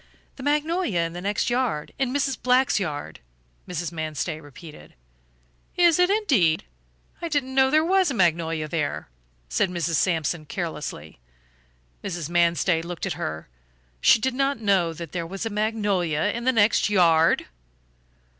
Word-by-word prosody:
"The - - -10
magnolia 295 - 0
in 165 0 -2
the 175 - -6
next 205 +5 -1
yard 240 -11 -1
in 265 -2 0
Mrs. 275 -1 0
Black's 255 -2 +3
yard," 145 - -5 0.5
Mrs. 175 -1 -4
Manstey 155 0 -4
repeated. 150 +2 -13 0.8
"Is 345 -2 +5
it, 360 +1 +4
indeed? 270 - +2 0.6
I 340 - -2
didn't 285 -4 -1
know 265 0 +4
there 310 +3 +3
was 375 -1 +3
a 275 - -3
magnolia 165 -4 +1
there," 150 - -3 0.4
said 60 - +1
Mrs. 170 -2 -1
Sampson, 165 -3 0
carelessly. 150 - -6 0.8
Mrs. 170 -4 -4
Manstey 170 0 +2
looked 170 +2 -5
at 190 - -2
her; 80 - -5 0.5
she - - +6
did 260 +3 -1
not 275 0 0
know 195 -6 +2
that 165 -1 -8
there 170 -2 -4
was 195 +5 -5
a 225 - -3
magnolia 205 -5 0
in 235 +1 -5
the 260 - +4
next 215 -3 +3
yard! 170 -4 +4
180 Hz, 150 wpm, -24 LUFS, 165-260 Hz, 0.8 s, she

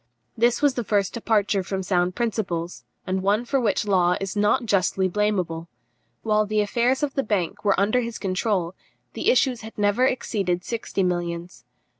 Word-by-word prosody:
This 240 +4 +2
was 285 -2 +4
the 245 - -2
first 200 -3 0
departure 210 -3 +1
from 190 +1 -4
sound 180 -1 0
principles, 180 - -2 0.2
and 185 0 -1
one 205 +5 +1
for 265 +2 0
which 215 -2 +1
Law 180 -3 +3
is 195 0 -4
not 210 +4 +2
justly 190 -2 +1
blameable. 185 -4 -1 0.6
While 215 -1 +2
the 215 0 0
affairs 240 +6 +1
of 280 -2 -1
the 275 - +1
bank 205 -8 -2
were 200 -2 +2
under 215 +5 +2
his 235 -1 -5
control, 190 -2 -1 0.4
the - - 0
issues 265 - +2
had 220 0 -10
never 205 +5 +3
exceeded 190 -8 -1
sixty 225 -3 -2
millions. 175 -6 -3
205 Hz, 170 wpm, -24 LUFS, 185-230 Hz, 0.6 s, was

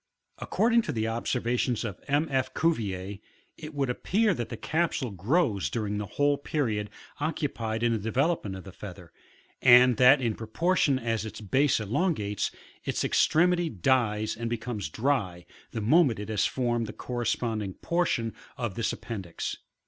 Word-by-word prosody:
According 235 +1 +2
to 160 - -4
the 110 -4 -1
observations 120 +1 -1
of 100 -5 -6
M. 145 +3 +2
F. 130 -1 0
Cuvier, 100 - -1 0.4
it 155 -1 -9
would 140 -2 0
appear 200 - +1
that 120 -8 -4
the - - -5
capsule 160 -6 -1
grows 105 - +1
during 105 -3 -2
the 105 - -4
whole 145 0 +3
period 110 -9 -1 0.3
occupied 120 -7 -2
in 120 - +3
the 115 - 0
developement 115 - 0
of 95 - -8
the 95 - -10
feather, 90 -3 -10 0.5
and 125 -1 +7
that 130 +3 +7
in 115 -4 0
proportion 140 - +1
as 115 -3 -1
its 110 0 -7
base 130 +7 +2
elongates, 110 - 0 0.3
its - - -1
extremity 175 +2 +3
dies 110 - +1
and 115 +1 -3
becomes 115 -6 -3
dry, 100 - -1 0.2
the 115 - -4
moment 130 +2 +4
it 105 +1 -6
has 105 -2 +2
formed 120 -3 -1
the 110 - -7
corresponding 115 -5 -2
portion 165 -10 0 0.2
of 120 -6 -2
this 115 +3 -1
appendix. 95 -8 -5
120 Hz, 155 wpm, -28 LUFS, 105-145 Hz, 0.5 s, and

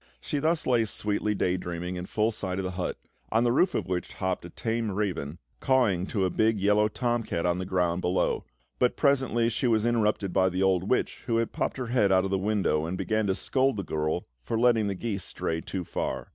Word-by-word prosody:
She 150 - -3
lay - - -1 0.3
thus 115 -2 +2
sweetly 105 0 -1
day 95 -1 +1
dreaming 90 0 -4
in 90 0 -5
full 110 +1 +1
sight 95 -4 -4
of 95 - -2
the 90 - -2
hut, 90 0 -3 0.3
on 115 +2 +3
the 120 - +3
roof 175 +9 +3
of - - -1
which 90 -1 -3
hopped 95 -1 -2
a 85 - -8
tame 115 +4 -2
raven 95 -7 -2 0.2
cawing 110 -9 +2
to 100 -4 0
a 90 - 0
big 110 -1 +2
yellow 105 +2 +3
tom 120 +2 -1
cat 85 -6 -3
on 90 0 +1
the 95 - -4
ground 90 -2 0
below; 90 +1 0 0.4
but, 125 - +2
presently, 130 -5 +2
she 120 +3 0
was 110 -2 +2
interrupted 105 -5 +1
by 95 -1 +3
the 90 +1 -1
old 95 0 +2
witch, 125 - 0
who 115 -1 +2
popped - - -3
her 125 -3 -4
head 105 -6 +3
out 95 0 +4
of 95 - -3
the 95 - +1
window 95 -6 +1
and 90 +2 -3
began 110 +1 0
to 95 - +1
scold 130 +2 +1
the 100 - -2
girl 80 +1 -2 0.2
for 110 - -2
letting 115 -3 +4
the 100 - -2
geese 100 -2 -3
stray 80 0 -3
too 95 +1 -4
far. - - -4
100 Hz, 230 wpm, -27 LUFS, 90-115 Hz, 0.4 s, out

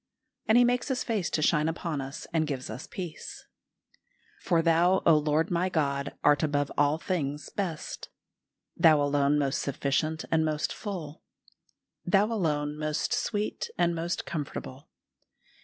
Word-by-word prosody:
And 220 - +5
He 245 - +7
makes 245 0 +1
His 265 -3 -1
face 215 -7 -1
to 155 - 0
shine 155 0 +3
upon 165 -3 -3
us 135 +2 -7
and 160 -2 +1
gives 135 -3 -4
us - - -7
peace. 175 -5 -7 0.9
"For 165 -1 +1
Thou, 175 +3 +3
O 165 - +7
Lord 155 +4 +1
my 175 +2 +1
God, 140 -4 -1
art 145 -1 +4
above 145 -2 0
all 145 +1 +3
things 150 -5 -3
best;... 175 -6 -4 0.7
Thou 155 -2 +6
alone 145 0 +2
most 140 -2 0
sufficient 145 +3 -1
and 160 -1 +3
most 155 -1 -1
full; 170 -8 -6 0.8
Thou 195 +3 +3
alone 150 -6 -1
most 155 0 -1
sweet 210 -1 -2
and 175 -1 +2
most 170 +1 -3
comfortable. 140 -2 -6
155 Hz, 145 wpm, -28 LUFS, 145-175 Hz, 0.9 s, He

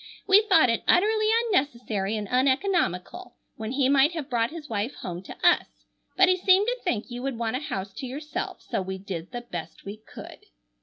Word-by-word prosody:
"We 400 +1 +6
thought 320 -10 +6
it 230 - -1
utterly 430 +4 +3 0.2
unnecessary 235 - -1
and 210 -1 -4
uneconomical, 265 - 0 0.2
when 220 +2 -5
he 270 -1 +2
might 280 +4 +4
have 300 -5 -6
brought 230 -1 +1
his 315 -1 -9
wife 220 +3 -3
home 175 0 -6
to 185 - -11
us, - - +4 0.5
but 375 0 +6
he 370 0 +3
seemed 375 +2 +4
to - - -1
think 240 - -2
you 240 0 -5
would 265 -2 -3
want 230 0 -2
a - - -4
house 195 -9 -5
to 260 - -5
yourself, 295 +4 -5
so - - -2
we 190 0 -5
did 185 -3 -7
the 240 -1 -5
best 175 -9 -8
we 200 +2 -7
could." 215 - -12
255 Hz, 200 wpm, -26 LUFS, 210-340 Hz, 0.5 s, We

